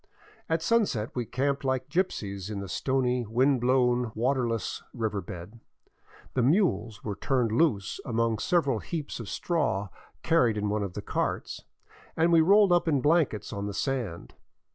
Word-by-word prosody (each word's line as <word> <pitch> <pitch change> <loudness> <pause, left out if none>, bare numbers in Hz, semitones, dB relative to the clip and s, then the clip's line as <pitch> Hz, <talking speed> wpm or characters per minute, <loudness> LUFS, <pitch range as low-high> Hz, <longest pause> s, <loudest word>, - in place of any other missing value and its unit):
At 160 0 0
sunset 180 - +1
we 125 -2 -2
camped 140 +3 -1
like 130 -1 -1
gypsies 100 - -2
in 105 -2 -4
the 100 - -5
stony, 125 +3 0
wind 130 +3 +2
blown, 125 -2 +2
waterless 120 -1 -1
river 110 -4 -2
bed; 90 +5 -9 0.7
the 130 - +1
mules 125 - +1
were 105 - -3
turned 120 +2 0
loose 115 - +1
among 115 -2 0
several 140 - +1
heaps 155 -1 -5
of 110 -4 -6
straw 125 - -1 0.3
carried 125 -10 +3
in 105 0 -1
one 105 +1 0
of 100 -3 -4
the - - -6
carts, - - -3 0.5
and 165 +1 +3
we 165 - +7
rolled 200 +3 +5
up 175 -1 +3
in 145 -4 +3
blankets 145 - +1
on 100 -1 -3
the 100 - -5
sand. 120 -11 -3
125 Hz, 160 wpm, -28 LUFS, 105-145 Hz, 0.7 s, we